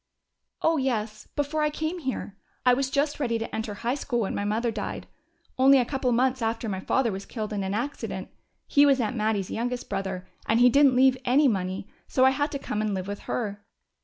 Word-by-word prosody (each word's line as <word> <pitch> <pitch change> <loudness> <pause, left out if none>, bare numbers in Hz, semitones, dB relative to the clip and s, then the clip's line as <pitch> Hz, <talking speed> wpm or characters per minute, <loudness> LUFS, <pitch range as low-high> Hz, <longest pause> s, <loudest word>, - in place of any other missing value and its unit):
"Oh, 325 0 +3
yes 220 -5 -2
before 295 +1 -1
I 300 - +3
came 315 +4 -3
here. 260 - -4 0.3
I 250 - +6
was 265 +1 0
just 285 +2 0
ready 235 -5 0
to 225 - -5
enter 220 -2 -3
high 235 +4 -1
school 255 -4 -1
when 200 - -1 0.2
mother 230 +3 0
died 210 -2 -5 0.5
only 270 +1 +7
a 250 - +3
couple 265 -1 -1
of 240 - +2
months 260 +1 +1
after 225 0 -1
my 190 -3 -2
father 235 +4 +1
was 195 0 -6
killed 215 -3 -4
in 205 - -1
an 190 +1 -2
accident. 265 +6 -4 0.4
He 285 - +4
was 275 -2 +5
Aunt 235 +1 -1
Mattie's 215 -3 0
youngest 245 +2 -3
brother. 190 -1 -3 0.2
And 225 +1 +3
he 250 +1 +7
didn't 275 0 +5
leave 260 0 +5
any 270 +4 +4
money, 190 -3 -1 0.2
so 260 - +3
I 265 - +6
had 290 +2 -1
to - - -1
come 215 -6 -3
and 215 -2 -1
live 185 -1 -3
with 205 0 -4
her." 205 -3 -3
245 Hz, 220 wpm, -26 LUFS, 210-270 Hz, 0.5 s, only